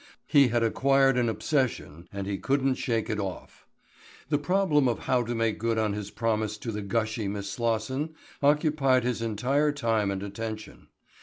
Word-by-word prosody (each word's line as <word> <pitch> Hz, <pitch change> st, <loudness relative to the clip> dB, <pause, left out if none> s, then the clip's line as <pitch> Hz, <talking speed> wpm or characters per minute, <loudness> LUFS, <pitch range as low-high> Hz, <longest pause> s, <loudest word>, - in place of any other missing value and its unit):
He 140 Hz, -2 st, +5 dB
had 120 Hz, -1 st, +1 dB
acquired 135 Hz, +3 st, +3 dB
an 120 Hz, -2 st, +2 dB
obsession 110 Hz, -, -2 dB
and 100 Hz, -1 st, -4 dB
he 100 Hz, -1 st, -3 dB
couldn't 135 Hz, -1 st, +1 dB
shake 115 Hz, -4 st, -1 dB
it 105 Hz, -, -2 dB
off. 95 Hz, -3 st, -6 dB, 0.6 s
The 145 Hz, -2 st, +2 dB
problem 150 Hz, -3 st, +2 dB
of 120 Hz, -, 0 dB
how 125 Hz, -1 st, +1 dB
to 120 Hz, 0 st, -3 dB
make 115 Hz, -1 st, 0 dB
good 115 Hz, 0 st, 0 dB
on 110 Hz, -2 st, +1 dB
his 105 Hz, -1 st, -5 dB
promise 110 Hz, -1 st, -1 dB
to 115 Hz, +2 st, -5 dB
the 105 Hz, -1 st, -4 dB
gushy 110 Hz, +1 st, -1 dB
Miss 100 Hz, 0 st, -4 dB
Slosson 120 Hz, +8 st, -1 dB, 0.3 s
occupied 145 Hz, -3 st, +3 dB
his 120 Hz, -2 st, -1 dB
entire 130 Hz, +7 st, +1 dB
time 115 Hz, -7 st, 0 dB
and 100 Hz, 0 st, -3 dB
attention. 110 Hz, +2 st, -7 dB
115 Hz, 170 wpm, -27 LUFS, 105-135 Hz, 0.6 s, He